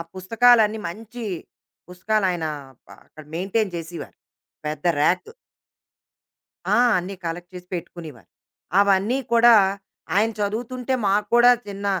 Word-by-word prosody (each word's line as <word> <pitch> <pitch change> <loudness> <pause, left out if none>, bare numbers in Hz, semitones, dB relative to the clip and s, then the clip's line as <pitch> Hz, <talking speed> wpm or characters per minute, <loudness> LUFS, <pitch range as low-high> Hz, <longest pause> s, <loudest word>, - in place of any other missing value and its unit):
పుస్తకాలన్నీ 220 +3 +3
మంచి 225 +5 -9 0.6
పుసకాలాయన 180 -2 -1 0.5
అ - - -11
అక్కడ 155 -1 -14
మెయింటైన్ 195 +3 -1
చేసివారు. 165 +1 -8 0.5
పెద్ద 150 +1 -5 0.2
ర్యాకు. 185 - +1 1.4
ఆ! - - +4 0.2
అన్నీ 185 +2 -5
కలెక్ట్ 175 +2 -6
చేసి 180 0 -10
పెట్టుకునివారు. 160 - -8 0.5
అవన్నీ 200 +5 +3 0.2
కూడా, 235 0 +7 0.6
ఆయన 220 +2 +3
చదువుతుంటే 240 +5 -3
మాకు 205 +1 +1
కూడా 240 +1 +7 0.2
చిన్న 200 0 -7
200 Hz, 105 wpm, -23 LUFS, 175-225 Hz, 1.4 s, కూడా